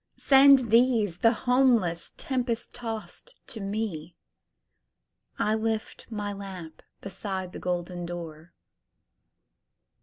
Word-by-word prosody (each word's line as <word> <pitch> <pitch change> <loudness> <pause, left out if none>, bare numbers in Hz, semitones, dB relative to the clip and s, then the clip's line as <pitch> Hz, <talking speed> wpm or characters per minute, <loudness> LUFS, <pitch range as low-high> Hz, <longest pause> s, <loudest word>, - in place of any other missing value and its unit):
Send 270 -3 +6
these, 230 -7 +3
the 230 - +5
homeless, 240 -10 +2
tempest 245 -3 -3
tost 235 - -7
to 225 - -10 1.8
me,I 215 - +1
lift 220 0 -3
my 205 -2 -3
lamp 190 -5 -9 0.2
beside 190 -1 -5
the - - -7
golden 175 0 -3
door!" 170 -1 -8
215 Hz, 90 wpm, -27 LUFS, 180-240 Hz, 1.8 s, Send